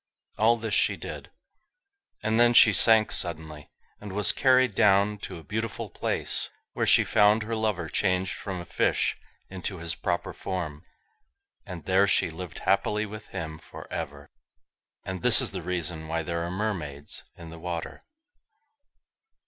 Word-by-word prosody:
All 115 +2 +4
this 110 -2 -4
she - - +3
did, - - -8 0.9
and 110 +1 +1
then 120 0 +5
she 110 - +8
sank 110 +1 +5
suddenly, 80 -3 -2 0.3
and 105 -2 -8
was 105 +1 +4
carried 130 -3 +3
down 100 +1 +3
to - - -7
a 80 - -11
beautiful 110 +3 -4
place, - - -1 0.2
where - - -1
she - - +6
found 105 +2 +4
her 115 +1 -3
lover 105 -7 -1
changed 95 +2 0
from 95 -3 -5
a 85 - -7
fish - - +1 0.3
into 95 +1 -5
his 85 0 -4
proper 85 -1 -2
form, 85 -5 -5 0.8
and 90 -4 -8
there 95 +1 +3
she 90 - +2
lived 90 +1 -8
happily 105 +1 +1
with 105 0 -9
him 80 -1 -6
for 80 - -11
ever. - - -6 0.7
And 95 -2 -5
this - - +5
is - - -1
the - - -5
reason 85 -3 -4
why 80 +1 -2
there 85 +1 -3
are 85 - -4
mermaids 85 -8 -4
in 85 -1 -11
the 85 - -10
water. 85 -1 -5
95 Hz, 155 wpm, -27 LUFS, 85-105 Hz, 0.9 s, she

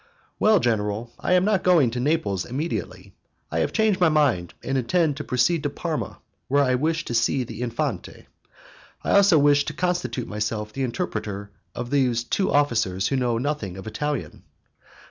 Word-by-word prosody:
"Well, 215 -2 +5
general, 110 -2 -1
I - - 0
am 180 +1 +4
not 205 -3 +2
going 170 -10 +4
to 125 - -3
Naples 125 - 0
immediately; 145 +7 -5 0.4
I - - 0
have - - 0
changed 215 -4 +1
my 175 - +6
mind 140 - +1
and 135 - -2
intend 150 +4 +1
to - - -4
proceed 135 +6 +1
to 145 - -1
Parma, 155 +2 -4 0.3
where 140 +1 +3
I 130 -2 +2
wish 160 +5 0
to - - -4
see 120 +3 +2
the 115 -1 -8
Infante. 120 -1 -3 0.8
I - - -1
also 200 -4 +6
wish 145 0 +4
to - - -4
constitute 180 -8 -2
myself 105 0 -3
the 135 - -4
interpreter 105 - -3 0.2
of 120 +1 -5
these 125 -4 +2
two 190 +10 0
officers 110 -10 +1
who 135 - 0
know 125 -3 +1
nothing 120 -8 -3
of 95 - -9
Italian." 145 +6 -4
135 Hz, 175 wpm, -24 LUFS, 115-160 Hz, 0.8 s, my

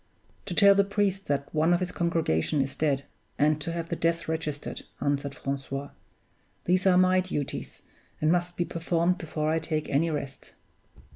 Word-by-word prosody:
"To 180 - -3
tell 200 0 +7
the 200 0 +4
priest 200 -1 -1
that 140 0 -2
one 160 +3 +3
of - - 0
his 180 -1 -2
congregation 160 - 0
is 135 0 0
dead, 140 -3 +1 0.3
and 150 +1 +2
to 165 - -3
have 170 0 -4
the 170 - -1
death 165 0 0
registered," 155 -2 -3 0.2
answered 140 -1 -1
Francois. 135 0 -4 0.7
"These 185 +2 +2
are 180 -1 +6
my 185 0 +5
duties, 180 -6 -4 0.4
and 155 +1 +3
must 175 0 0
be 175 - +1
performed 170 +2 0
before 155 -1 -2
I 160 - +2
take 155 -1 -2
any 155 +4 +2
rest." 140 -3 -5
165 Hz, 170 wpm, -27 LUFS, 145-180 Hz, 0.7 s, tell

